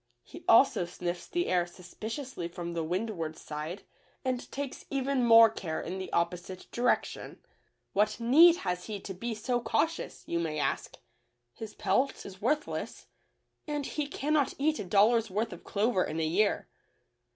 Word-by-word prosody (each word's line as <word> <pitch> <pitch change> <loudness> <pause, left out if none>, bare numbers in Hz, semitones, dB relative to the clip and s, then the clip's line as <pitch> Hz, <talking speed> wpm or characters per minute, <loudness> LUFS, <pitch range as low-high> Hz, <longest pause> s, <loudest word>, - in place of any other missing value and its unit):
He - - -12
also 230 -6 +6
sniffs 175 0 -5
the 350 +1 -1
air 175 -1 +1
suspiciously 210 - -6
from 170 0 -6
the 165 -1 -1
windward 170 -2 -3
side, 155 +5 -6 0.4
and 255 -1 -2
takes 280 -1 -5
even 275 -1 0
more 230 -1 +9
care 180 -7 -4
in 185 +3 -5
the 185 - -6
opposite 180 +2 -2
direction. 245 +1 0 0.6
What 210 +4 +2
need 310 +9 +7
has 180 -1 -2
he 210 -2 -5
to 195 - -7
be 230 +5 -4
so 240 +3 -1
cautious, 320 +8 -1
you 170 - -1
may 160 -2 -2
ask. 150 - -2 0.6
His 220 -1 -8
pelt 270 +1 0
is 190 +1 -10
worthless, 300 +7 -2 0.6
and 295 -2 -2
he 295 0 -2
cannot 290 0 0
eat 305 +2 +1
a - - -2
dollar's 215 +4 +4
worth 215 +3 -1
of 175 - -11
clover 205 -2 +1
in 155 +2 -3
a 160 - +1
year. 195 +6 +1
215 Hz, 160 wpm, -30 LUFS, 175-255 Hz, 0.6 s, more